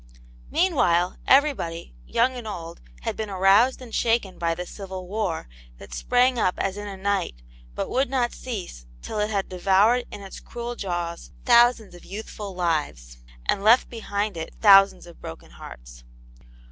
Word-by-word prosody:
Meanwhile 180 - +2
everybody, 260 - +2
young 250 +3 +2
and 245 -3 -7
old, 170 -5 -7 0.2
had - - -3
been 220 -1 -4
aroused 200 +7 +4
and 235 -3 -12
shaken 225 -5 0
by 165 -1 0
the 180 +1 -5
civil 190 -1 -8
war, 195 - -2 0.3
that - - -13
spranjg 245 - +2
up 185 - +1
as 195 0 -1
in 205 0 -6
a 195 -1 -7
night, 190 - -2 0.3
but - - -2
would 265 +1 0
not 250 -3 0
cease 185 - -7 0.2
till 215 - -4
it 210 0 0
had 200 -3 -1
devoured 195 +7 +3
in 205 - -9
its 195 - -9
cruel 240 0 -6
jaws 175 -4 -4 0.2
thousands 240 -4 +4
of 175 - -13
youthful 205 0 -7
lives, 150 - -2 0.3
and 195 - +1
left 225 +4 +5
behind 210 -4 -3
it 160 0 -6
thousands 195 -3 +6
of 170 -1 -15
broken 80 - -9
hearts. - - -12
195 Hz, 160 wpm, -24 LUFS, 175-235 Hz, 0.3 s, thousands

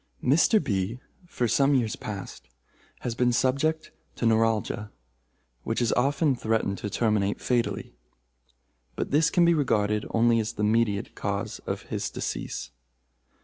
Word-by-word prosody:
"Mr. 155 - +4
B., 105 - -2 0.3
for 125 -7 -1
some 140 +4 +3
years 115 -4 +1
past, 100 -3 -7 0.5
has 120 - -2
been 125 +1 +2
subject 140 +6 0 0.2
to - - -2
neuralgia, 110 -2 +1 0.7
which 115 - -2
has 120 -2 +1
often 140 +2 +2
threatened 110 -4 -1
to 105 - -4
terminate 105 -2 0
fatally; 120 -2 -1 1.0
but - - -3
this 150 +2 +4
can 175 -2 +3
be 170 - +5
regarded 105 -8 +1
only 115 0 +3
as 110 0 -2
the 105 - -3
mediate 105 -2 +1
cause - - -3
of - - -3
his - - -3
decease. - - -5
115 Hz, 140 wpm, -26 LUFS, 105-135 Hz, 1.0 s, be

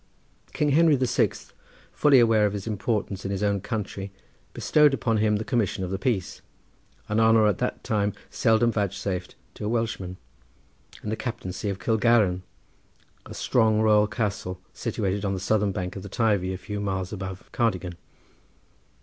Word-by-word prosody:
King 150 - 0
Henry 155 +1 +5
the 130 -1 +1
Sixth, 120 - -1 0.4
fully 140 -3 +5
aware 110 -3 +4
of 100 - -3
his 100 -2 -5
importance 105 -2 -2
in 95 - -3
his 100 0 -2
own 100 -1 +1
country, 100 -2 -4 0.4
bestowed 150 -2 +3
upon 115 -2 0
him 105 0 +2
the 105 +1 -3
commission 110 -6 0
of 90 - -4
the 95 - -2
peace, 105 -7 -2 0.7
an 105 +1 0
honour 110 -1 +5
at 105 -3 +1
that - - -2
time 105 -2 0 0.2
seldom 115 +1 +3
vouchsafed 100 -3 -3 0.2
to - - -9
a - - -1
Welshman, 110 -6 -2 0.9
and 105 - -3
the - - 0
captaincy 110 -5 -4
of 100 - -3
Kilgarran, 105 -2 +2 0.9
a - - -9
strong 110 -3 +2
royal 105 -1 +4
castle 100 -4 -3
situated 100 -1 -2
on 100 -1 0
the - - -4
southern 100 +1 +1
bank 95 -1 -4
of 95 - -6
the 100 - -8
Teivi 100 -4 +1
a 95 - -3
few 105 +3 -6
miles 95 -1 -3
above 95 -2 -7
Cardigan. 95 -7 0
105 Hz, 165 wpm, -25 LUFS, 95-115 Hz, 0.9 s, Henry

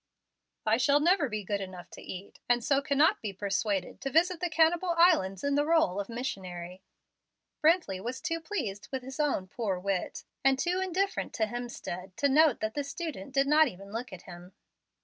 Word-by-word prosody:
"I 220 +1 +3
shall 280 +3 +4
never 335 -2 +3
be 215 -1 -3
good 200 +1 -2
enough 185 -2 -8
to - - -10
eat, 185 +2 -9
and 240 -1 +3
so 275 +2 +2
cannot 285 +2 +3
be 210 -3 -4
persuaded 195 0 -2
to 270 - -2
visit 335 +4 +3
the 355 0 -1
Cannibal 335 +2 +3
Islands 310 - +4
in 285 0 +1
the 290 +1 +3
role 305 - +2
of 200 - -4
missionary." 185 -7 -5 0.8
Brently 310 - +3
was 250 +3 -4
too 330 0 -2
pleased 220 - -4
with 265 -2 -3
his 265 +3 -8
own 280 -11 0
poor 200 -2 -2
wit, 190 0 -3 0.2
and 270 0 +4
too 355 +6 0
indifferent 380 +2 -1
to 220 - +1
Hemstead, 210 -6 -6
to 285 - +2
note 295 -1 +4
that 215 0 -1
the 290 - -2
student 280 - -6
did 275 0 +4
not 305 +2 +5
even 195 -3 -9
look 240 +1 -4
at 185 -1 -10
him. 175 +1 -12
250 Hz, 190 wpm, -29 LUFS, 195-315 Hz, 0.8 s, not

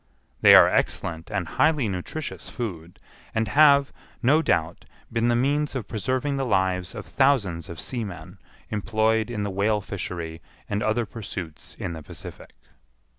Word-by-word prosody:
They - - +9
are - - +9
excellent 80 0 -1
and 100 -5 -2
highly 150 - +2
nutritious 100 - -5
food, 90 -9 -6 0.4
and 110 0 +1
have, 140 +1 +5 0.3
no 145 +6 +5
doubt, 85 - 0 0.3
been 115 0 +1
the 120 - +3
means 145 +4 +1
of 120 -6 -4
preserving 130 +6 -1
the 135 - 0
lives 95 -5 0
of - - -6
thousands 110 - +1
of 85 - -8
seamen 110 -8 -6 0.3
employed 110 +1 +1
in 105 -4 -3
the 100 - -2
whale 105 +3 +1
fishery 85 -5 -6 0.3
and 100 +1 -2
other 110 +2 +1
pursuits 95 -7 -7
in 85 - -4
the 80 - -7
Pacific. - - -10
110 Hz, 150 wpm, -25 LUFS, 90-130 Hz, 0.4 s, They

